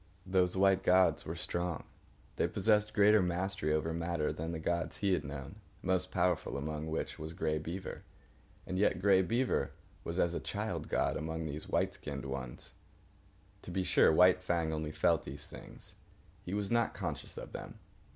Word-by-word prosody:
Those 90 -1 +2
white 95 0 +4
gods 95 0 +4
were 80 - -3
strong. 85 -1 -2 0.5
They - - +2
possessed 105 +1 +2
greater 105 0 +6
mastery 90 -2 -1
over 80 +1 0
matter 85 -2 -1
than 80 +2 -4
the 85 - -3
gods 85 +1 -1
he 100 -2 +2
had - - 0
known, 70 -2 -7 0.3
most 95 0 +1
powerful 90 -5 0
among 75 +2 -3
which 80 0 -3
was 80 +1 -5
Grey 80 -2 0
Beaver. 85 +5 -5 0.6
And 95 - -2
yet 105 - +3
Grey 95 0 +5
Beaver 120 +7 0 0.3
was 85 - -3
as 85 -2 +2
a - - -1
child - - -3
god - - +1
among 80 +1 -3
these 75 0 -5
white - - +1
skinned 70 -2 -6
ones. 65 -3 -6 0.9
To - - -10
be 95 +1 -1
sure, - - +5
White 90 +3 +6
Fang 85 -3 0
only 75 -1 -3
felt 80 +1 +2
these 70 +2 -7
things. - - -10 0.5
He 90 - -4
was 105 0 -1
not 115 -1 +2
conscious 80 -7 -5
of - - -7
them. - - -8
85 Hz, 175 wpm, -33 LUFS, 80-95 Hz, 0.9 s, greater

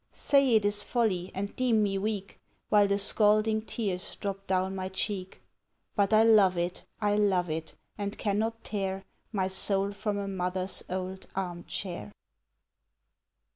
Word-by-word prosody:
Say 275 -4 +3
it 215 -2 +3
is 205 0 +3
folly, 195 -7 0
and 200 +1 -4
deem 235 -4 +2
me 195 -1 0
weak 200 -1 -3 0.3
While 205 -1 +5
the 200 0 +1
scalding 215 +2 +3
tears 200 -5 -3
drop 195 -1 -5
down 190 0 +1
my 190 -1 -3
cheek: 190 0 -3 0.5
But 200 -1 +2
I 215 0 +6
love 205 -5 +5
it, 175 +1 -2 0.2
I 205 -1 +2
love 185 -5 +2
it, 160 +1 -5 0.2
and 200 0 -3
cannot 220 +2 -1
tear 195 -2 -3 0.3
My 190 -4 0
soul 195 +1 +2
from 205 0 -2
a 200 -1 -3
mother's 185 0 -2
old 185 +1 -4
arm 175 -2 -4
chair. 190 +1 -5
200 Hz, 150 wpm, -29 LUFS, 185-210 Hz, 0.5 s, I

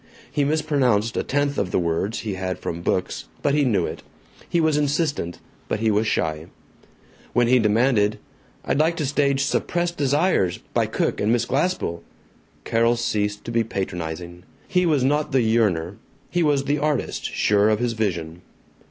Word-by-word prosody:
He 145 - +1
mispronounced 140 -7 +1
a - - +1
tenth 145 0 0
of 95 - -1
the - - 0
words 85 +5 -1
he 105 -3 -3
had 95 0 -3
from 85 0 -5
books, 90 +1 -1 0.2
but 140 - +2
he 145 0 +3
knew 100 -10 +2
it. - - -6 0.5
He 170 - +1
was 160 -2 +2
insistent, 145 - 0 0.3
but - - -1
he 110 0 +2
was 105 +2 +1
shy. 80 -4 -1 0.9
When 120 0 +4
he 125 +1 +5
demanded, 110 -1 +2 0.5
"I'd 140 - 0
like 165 +2 +2
to 150 - -1
stage 140 0 +1
'Suppressed 175 +5 -1
Desires,' 145 - +2 0.2
by - - +2
Cook - - -1
and 105 - +2
Miss 120 0 +2
Glaspell," 140 - -1 0.6
Carol 115 +1 +2
ceased 105 -3 -2
to 115 - -4
be 115 0 +2
patronizing. 85 -4 -5 0.3
He 180 -2 +2
was 145 -5 +2
not 145 +2 +1
the 130 -3 +4
yearner: 105 -5 +1 0.3
he 175 - +1
was 145 -4 +2
the 145 +1 0
artist, 150 0 -1
sure 105 +1 +3
of 110 - +3
his 120 +1 -1
vision. 90 -6 -3
115 Hz, 170 wpm, -23 LUFS, 100-145 Hz, 0.9 s, he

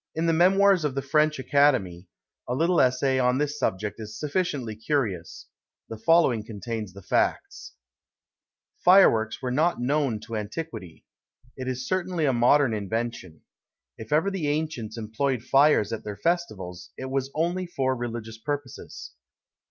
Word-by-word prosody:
In 160 +1 -1
the 165 - +2
Memoirs 190 +2 +4
of 145 -3 -1
the 135 - -2
French 150 +2 +2
Academy, 130 -11 +1 0.4
a 125 - -1
little 170 +5 +3
essay 130 +1 +2
on 125 0 +2
this 150 +1 -2
subject 105 +3 -2
is 110 0 -8
sufficiently 145 - -2
curious; 110 - -3 0.4
the 115 - -6
following 135 -5 +3
contains 110 -2 -6
the 100 0 -12
facts: - - -1 1.1
FIREWORKS 130 - +5
were 125 - -1
not 160 +7 +1
known 135 -3 0
to 115 - -7
antiquity. 105 - -6 0.5
It 130 -1 -6
is 130 0 -3
certainly 185 -3 -1
a 135 - +2
modern 125 +1 +4
invention. 105 -5 -4 0.5
If 110 -1 -11
ever 160 +7 +2
the 180 -6 -2
ancients 145 -7 -3
employed 115 +3 -2
fires 135 -6 +3
at 115 - -5
their 105 -1 -6
festivals, 110 - -3
it 130 0 -6
was 135 0 -1
only 175 +3 -1
for 130 -6 -1
religious 115 -2 -6
purposes. 130 - -6
130 Hz, 145 wpm, -26 LUFS, 110-155 Hz, 1.1 s, FIREWORKS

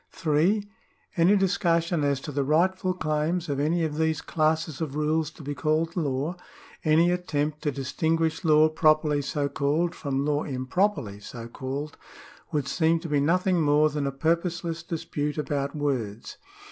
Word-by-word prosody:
(3) 180 +6 +1 0.5
Any 180 +3 +5
discussion 175 -4 +1
as 140 -1 +1
to 150 - -6
the 140 0 0
rightful 185 +5 +1
claims 160 +1 -1
of 140 -1 -1
any 165 +4 +1
of 155 -1 -2
these 160 -1 +1
classes 155 -1 0
of 150 -3 -3
rules 155 0 0
to 155 - -13
be 145 +1 -3
called 160 +3 0
law 150 0 -1 0.2
— - - -20
any 165 +2 +4
attempt 155 -4 -2
to 150 -1 0
distinguish 160 +5 -1
law 155 -1 +5
properly 155 -2 +2
so 145 +1 -1
called 150 +5 0
from 140 -3 -2
law 150 0 +1
improperly 130 - -1
so 115 +3 -8
called 140 +4 -5 0.3
— - - -22
would 145 -4 -1
seem 165 +3 +2
to 165 - -6
be 145 -1 +2
nothing 180 +4 +2
more 150 0 +4
than 145 -1 -2
a - - -1
purposeless 165 +3 -1
dispute 150 -3 -3
about 145 -1 -2
words. 125 -8 -3
155 Hz, 165 wpm, -26 LUFS, 145-165 Hz, 0.5 s, Any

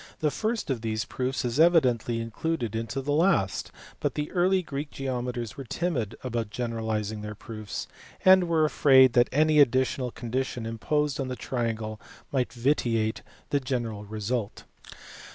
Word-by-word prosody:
The 150 -2 +1
first 220 -5 -2
of 120 -4 -2
these 110 -1 -2
proofs 130 0 -2
is 120 +4 -1
evidently 125 -9 +4
included 115 0 -3
in 115 +1 -2
the 135 +5 -3
last, 150 - +2 0.3
but - - -1
the 150 0 -3
early 185 +1 +2
Greek 145 -1 -5
geometers 125 -3 -4
were 135 - -5
timid 130 - -2
about 120 -4 -2
generalizing 110 -3 -3
their 105 0 -6
proofs, 110 0 -6 0.4
and 185 -1 +7
were 160 -2 +3
afraid 130 -4 +6
that 120 -1 +4
any 155 +1 +4
additional 130 -1 +3
condition 120 0 -3
imposed 145 +6 -1
on 135 - -1
the 130 - -3
triangle 115 -4 -3 0.3
might 130 -3 0
vitiate 120 -4 0 0.3
the 145 - +3
general 120 -5 -3
result. 105 +1 -3
125 Hz, 150 wpm, -27 LUFS, 115-145 Hz, 0.4 s, and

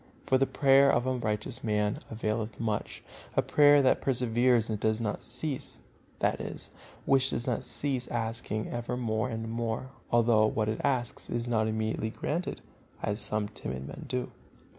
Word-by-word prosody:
For 130 - +3
the 135 - +3
prayer 140 0 +5
of 120 - +1
a 130 - +1
righteous 110 -3 -2
man 105 -2 0
availeth 110 -1 -2
much, 110 -3 -2 0.3
a - - +3
prayer 145 -1 +6
that 130 - +3
perseveres 120 -2 +2
and 110 -2 -2
does 110 +1 +1
not 110 -3 -2
cease" 150 -5 -3 0.4
(that - - 0
is, - - -6 0.3
which 135 -1 +4
does 120 - -2
not 125 -3 -1
cease 130 -4 -2
asking 115 -2 -2
ever 120 +1 -3
more 115 0 -1
and 115 -1 -4
more, 115 +2 -3 0.2
although 115 -2 +5
what 110 0 0
it 110 - -2
asks 125 -4 -1
is 120 0 -2
not 110 -2 +2
immediately 110 0 -1
granted, 165 +9 -3 0.4
as 105 +2 -1
some 105 -1 +1
timid 65 -10 -6
men - - -8
do). 125 -1 -2
115 Hz, 165 wpm, -29 LUFS, 110-130 Hz, 0.4 s, prayer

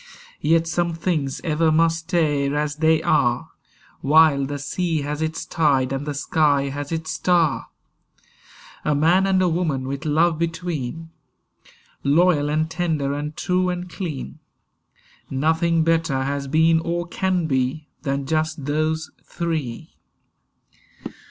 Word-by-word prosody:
Yet 165 +2 +2
some 170 0 -1
things 155 -5 -2
ever 160 -1 +2
must 165 +1 +3
stay 145 -5 +1
as 145 0 -1
they 160 0 +3
are 120 -5 +1 0.5
While 145 -2 +4
the 145 +1 -4
sea 160 +3 -2
has 150 +1 -4
its 160 0 -2
tide 135 -5 +1
and 135 +2 -4
the 145 - -3
sky 145 -1 +1
has 145 +2 -5
its 160 -1 -3
star. 165 -1 +1 1.2
A 150 - +1
man 175 +6 +3
and 190 -1 +3
a - - +3
woman 160 -6 -1
with 140 +2 -4
love 160 +1 +2
between, 165 -2 -3 0.9
Loyal 150 0 +3
and 155 +1 +1
tender 160 -4 -1
and 150 +1 -5
true 180 0 +1
and 180 0 -3
clean, 155 - -6 0.9
Nothing 160 +4 +1
better 165 -5 +1
has 140 0 -3
been 160 +3 +3
or 170 +1 -2
can 180 0 -1
be 135 +1 -1
Than 140 -1 -2
just 155 -1 -1
those 155 +2 -1
three. 160 -9 -4
155 Hz, 130 wpm, -22 LUFS, 145-165 Hz, 1.2 s, While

